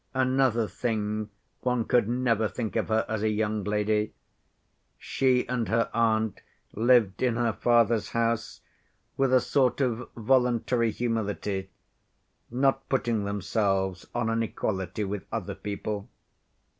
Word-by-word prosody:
Another 130 -3 +2
thing, 105 -2 -2 0.3
one 125 -2 0
could 120 -3 +2
never 120 -3 +1
think 110 0 -4
of 110 - 0
her 110 0 +1
as 110 -2 -2
a 110 - +2
young 105 -1 -1
lady. 105 +1 0 0.8
She 130 -2 +1
and 125 -2 -1
her 115 0 +1
aunt 110 -2 +1 0.3
lived 115 -3 +3
in 125 -3 +2
her 115 -1 +1
father's 115 -2 +2
house 115 -1 -1 0.5
with 135 -1 +1
a 130 - +6
sort 130 0 +1
of 125 -3 -1
voluntary 120 0 +2
humility, 105 -4 -2 0.8
not 135 +2 +1
putting 115 -6 0
themselves 95 -1 -1
on 115 -1 0
an 115 0 +1
equality 95 -3 -2
with 100 -2 -4
other - - -3
people. 105 0 -5
115 Hz, 130 wpm, -27 LUFS, 105-120 Hz, 0.8 s, a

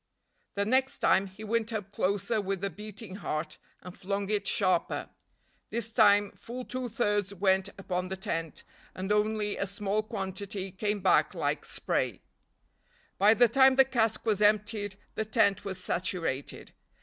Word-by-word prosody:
The 200 0 0
next 260 +4 +2
time 195 +1 +3
he 195 +3 -12
went 225 +1 0
up 205 -3 -4
closer 200 +3 0
with 195 -1 -3
a 200 - -1
beating 210 +1 -9
heart, 155 -5 -4 0.2
and 180 +1 -9
flung 200 +1 -3
it 205 -1 0
sharper. 185 -3 +1 0.6
This 230 0 -2
time 205 -3 +5
full 250 +2 -8
two 255 -1 -4
thirds 205 -3 0
went 190 0 +2
upon 180 -2 -3
the 190 +1 -5
tent, 165 -4 -4 0.3
and 190 +2 -3
only 210 0 +1
a 200 - -1
small 205 +2 -1
quantity 195 -2 -4
came 205 +2 -2
back 185 - +3
like - - -1
spray. - - -2 1.0
By 210 +3 +6
the 240 +2 +6
time 265 +3 +5
the 270 0 +7
cask 225 -4 0
was 210 -2 +1
emptied, 210 -1 +2 0.2
the - - -1
tent 210 -3 +2
was 190 -2 -4
saturated. 170 -7 -3
205 Hz, 155 wpm, -29 LUFS, 190-220 Hz, 1.0 s, the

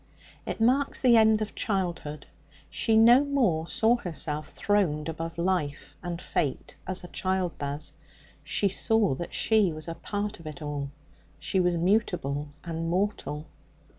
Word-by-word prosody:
It - - -3
marks 260 +5 +2
the 245 -3 +5
end 220 -1 +5
of 215 - -7
childhood. 175 -7 -2 0.5
She 225 -2 +2
no 240 +5 +7
more 235 - +1
saw 225 +6 +3
herself 155 -6 -3
throned 190 -7 0
above 165 +1 -5
life 170 -5 -1
and 175 -1 -4
fate, 140 -6 -2
as 185 0 -3
a - - -7
child 185 -3 -1
does. 145 +2 -4 0.5
She 200 - +1
saw 210 -1 +2
that 170 +5 -5
she 215 -5 +3
was 155 +1 -6
a 165 - -3
part 205 +3 -4
of 165 - -10
it 150 -2 -7
all; 145 -2 -4 0.5
she 190 - -1
was 180 -1 +2
mutable 170 -6 0 0.2
and 165 -1 -3
mortal. 175 -5 -1
180 Hz, 150 wpm, -28 LUFS, 155-210 Hz, 0.5 s, no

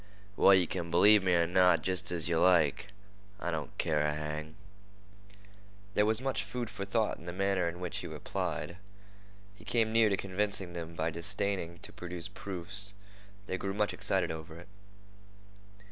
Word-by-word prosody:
"Well, 100 - +7
yeh 90 -2 +4
kin 85 0 -4
b'lieve 105 +5 +6
me 90 -2 +2
er 85 0 +4
not, 90 -2 +4
jest 95 -1 0
as 85 -3 0
yeh 85 - +1
like. 85 0 +3 0.5
I 85 - -2
don't 75 -5 -5
care 75 -2 +1
a 75 0 +1
hang." 75 +1 -5 1.4
There 105 +1 +3
was 110 0 +2
much 130 -5 -1
food 120 +3 -4
for 100 - -5
thought 110 +2 0
in 85 - -13
the - - -3
manner 95 -1 +1
in 85 +1 -8
which 90 -1 -3
he - - -6
replied. 85 - -4 0.8
He 105 - -17
came 110 0 +1
near 115 -1 +5
to 100 - +1
convincing 100 -1 -1
them 85 -1 -6
by 80 0 -1
disdaining 90 0 -2
to - - -6
produce 90 0 -6
proofs. 100 +1 -5 0.5
They 95 -2 -3
grew 95 0 -3
much 105 0 +1
excited - - 0
over 80 0 -8
it. 85 - -12
90 Hz, 175 wpm, -31 LUFS, 85-100 Hz, 1.4 s, Well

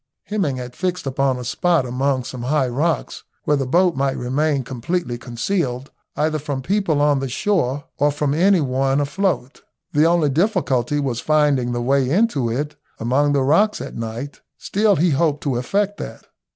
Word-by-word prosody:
Hemming 195 -10 -1
had 125 0 -7
fixed 180 -2 -2
upon 135 -1 0
a 125 - -6
spot 150 +4 +1
among 130 +1 0
some 125 0 -7
high 130 +2 +1
rocks 150 +7 -1 0.2
where 150 - +2
the 135 -2 -1
boat 175 +4 +3
might 135 0 0
remain 140 +3 0
completely 130 +3 -3
concealed 125 +2 -3 0.2
either 155 +1 0
from 140 -2 -4
people 190 -3 +1
on 145 -1 +3
the 135 -1 -3
shore 145 -3 0 0.2
or 145 +1 +4
from 145 -1 -1
any 185 +3 +4
one 135 0 +1
afloat. 145 -2 -1 0.3
The 150 +2 +3
only 165 -3 +3
difficulty 145 - +1
was 130 -5 -1
finding 145 -5 +2
the 120 0 -2
way 135 0 +2
into 155 - +2
it 145 +6 -3 0.2
among 135 +5 +2
the 140 -2 +2
rocks 200 +10 +3
at - - -7
night, 115 +5 -6 0.2
still 205 0 +2
he 175 +1 +2
hoped 150 0 +1
to 135 -5 0
effect 200 +11 -1
that. - - -8
145 Hz, 175 wpm, -21 LUFS, 130-165 Hz, 0.3 s, or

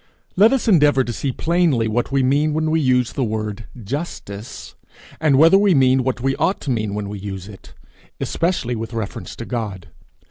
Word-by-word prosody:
Let 210 +5 +6
us 270 -3 0
endeavour 145 -9 +4
to 120 - -4
see 135 +3 -2
plainly 160 -6 +1
what 120 +4 -1
we 135 -1 +2
mean 145 +4 +2
when 155 0 0
we 160 0 +2
use 125 -3 +1
the 135 - -1
word 110 -1 -3 0.2
justice, 115 - -6 0.5
and 150 -4 +3
whether 165 +6 +6
we 200 -4 +3
mean 130 -1 +4
what 125 -1 -2
we 135 +1 0
ought 190 - 0
to 140 - -3
mean 110 -4 -2
when 105 -1 -4
we 100 0 -6
use 95 -1 -7
it 105 -2 -14 0.4
especially 165 -8 -1
with 115 +1 -6
reference 110 -3 -5
to 115 - -7
God. 105 -8 -5
130 Hz, 190 wpm, -20 LUFS, 110-155 Hz, 0.5 s, Let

